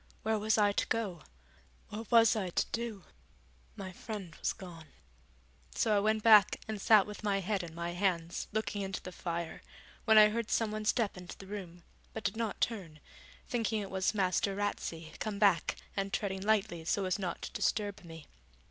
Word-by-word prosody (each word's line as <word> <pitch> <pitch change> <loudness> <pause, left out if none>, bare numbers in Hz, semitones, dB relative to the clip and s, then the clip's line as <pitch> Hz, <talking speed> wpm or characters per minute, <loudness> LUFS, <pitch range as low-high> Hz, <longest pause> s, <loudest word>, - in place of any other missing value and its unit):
where 220 0 +1
was 220 +2 +2
I 205 -1 +4
to - - 0
go, 195 -8 -2 0.7
what 220 +1 -7
was 230 -2 +6
I 195 -4 -1
to - - +1
do? 225 -5 -3 0.7
My 195 -3 -6
friend 195 -3 -7
was - - 0
gone. 170 -4 -10 0.9
So 215 -2 +2
I - - +4
went 215 +1 +1
back 215 -3 +7
and 215 -2 -4
sat 210 -2 +6
with 210 +1 -9
my 200 -1 +1
head 195 +1 -1
in 165 -2 -9
my 170 0 -3
hands 175 -2 -1
looking 215 -1 -2
into 195 -1 -4
the 185 - -7
fire, 170 -2 -4 0.4
when 220 -1 +6
I 210 0 +9
heard 230 +1 -2
someone 215 -1 0
step 215 -3 +1
into 180 -1 -9
the 195 - -11
room, 185 -4 -8 0.3
but 220 - -6
did - - -1
not 225 -2 -2
turn, 180 -10 -2 0.5
thinking 225 -3 0
it 200 -2 -5
was 190 +2 0
Master 195 0 +1
Ratsey 165 -5 -3
come 215 -2 -3
back 195 -6 +3 0.2
and 195 0 -1
treading 190 -2 -2
lightly 205 -5 +1
so 195 +4 0
as 185 +2 0
not 180 -3 -3
to - - -5
disturb 205 -2 -1
me. 165 -2 -10
200 Hz, 185 wpm, -32 LUFS, 180-215 Hz, 0.9 s, I